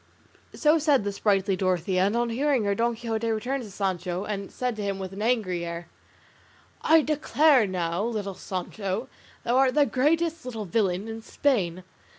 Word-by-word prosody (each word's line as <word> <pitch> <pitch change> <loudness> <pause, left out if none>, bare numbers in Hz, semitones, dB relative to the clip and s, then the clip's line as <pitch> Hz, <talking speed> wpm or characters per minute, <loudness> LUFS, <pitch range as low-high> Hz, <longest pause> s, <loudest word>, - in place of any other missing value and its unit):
So 310 +1 +4
said 290 -6 +3
the 205 - -1
sprightly 195 -1 +1
Dorothea, 185 0 +1
and 205 - -1
on 240 -1 0
hearing 270 0 +1
her 200 0 +1
Don 235 +3 0
Quixote 225 -1 -2
turned 265 +4 -2
to 220 - -8
Sancho, 185 -2 -2
and 200 -2 -4
said 250 -2 -2
to - - -4
him, 200 -1 -2
with 190 -1 -6
an 200 - -6
angry 215 -7 0
air, 170 0 -6 0.9
"I 320 -1 +5
declare 300 -4 +3
now, 175 0 -1
little 215 -4 -3
Sancho, 195 +5 -4 0.3
thou 240 +2 +1
art 265 0 +3
the 295 -1 +5
greatest 320 +5 +1
little 225 -4 -5
villain 195 0 0
in 225 0 -6
Spain. 185 -10 0
215 Hz, 170 wpm, -26 LUFS, 190-255 Hz, 0.9 s, I